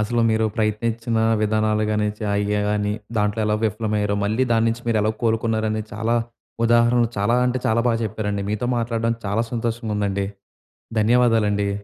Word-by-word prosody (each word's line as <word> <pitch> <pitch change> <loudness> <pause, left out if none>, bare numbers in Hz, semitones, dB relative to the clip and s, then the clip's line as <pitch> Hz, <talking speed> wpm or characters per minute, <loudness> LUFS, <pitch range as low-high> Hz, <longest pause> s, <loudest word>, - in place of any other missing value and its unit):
అసలు 115 +3 0
మీరు 110 0 +2
ప్రయత్నించిన 115 +1 -1 0.3
విధానాలు 110 0 +1
గాని, 105 0 +1
చాయ్ 105 -1 0
గే 105 0 +1
గాని. 105 0 0 0.3
దాంట్లో 105 +1 0
ఎలా 105 0 +1
విఫలమయ్యారో, 105 -1 0
మళ్ళీ 110 +5 +1
దాన్నించి 115 +1 +1
మీరు 115 -2 +2
ఎలా 110 - +2
కోలుకున్నారని 110 -1 0
చాలా 115 +2 0 0.5
ఉదాహరణలు 120 0 +4
చాలా 100 +4 +2
అంటే 125 +1 0
చాలా 110 +1 +2
బాగా 115 -1 +2
చెప్పారండి. 105 -2 -3
మీతో 110 +3 -1
మాట్లాడడం 115 0 -1
చాలా 105 +4 0
సంతోషంగుందండి. 105 -4 -1 0.7
ధన్యవాదాలండి. 110 -3 +3
110 Hz, 140 wpm, -22 LUFS, 105-115 Hz, 0.7 s, ఉదాహరణలు